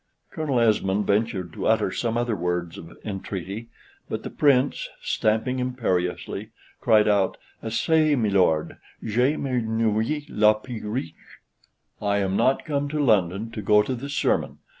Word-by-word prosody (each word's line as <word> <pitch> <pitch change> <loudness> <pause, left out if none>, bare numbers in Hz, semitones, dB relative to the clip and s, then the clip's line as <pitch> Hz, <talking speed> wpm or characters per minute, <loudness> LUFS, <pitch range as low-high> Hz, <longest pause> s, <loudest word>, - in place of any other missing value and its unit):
Colonel 145 -6 -1
Esmond 105 -3 +2
ventured 100 -5 0
to - - -3
utter 110 -3 +2
some 115 +2 -1
other 120 -2 0
words 90 -1 -2
of 80 - -12
entreaty, 100 +2 -5 0.4
but - - -4
the - - -6
Prince, 140 -2 +2
stamping 110 +4 0
imperiously, 110 -4 -2 0.3
cried 110 -3 +4
out, 100 -2 +2 0.2
"Assez, 155 +6 +2
milord: 95 -8 +2 0.3
je 125 +7 +1
m'ennuye 115 +2 -1
a - - -13
la 105 0 +5
preche; 110 -4 -5 0.9
I 100 -1 +1
am 95 -1 0
not 130 +6 +2
come 145 -1 -1
to 150 +1 -2
London 105 -4 +2
to 110 - -5
go 105 +1 +4
to 130 - -3
the 130 +3 -6
sermon." 140 - 0
110 Hz, 140 wpm, -24 LUFS, 100-125 Hz, 0.9 s, la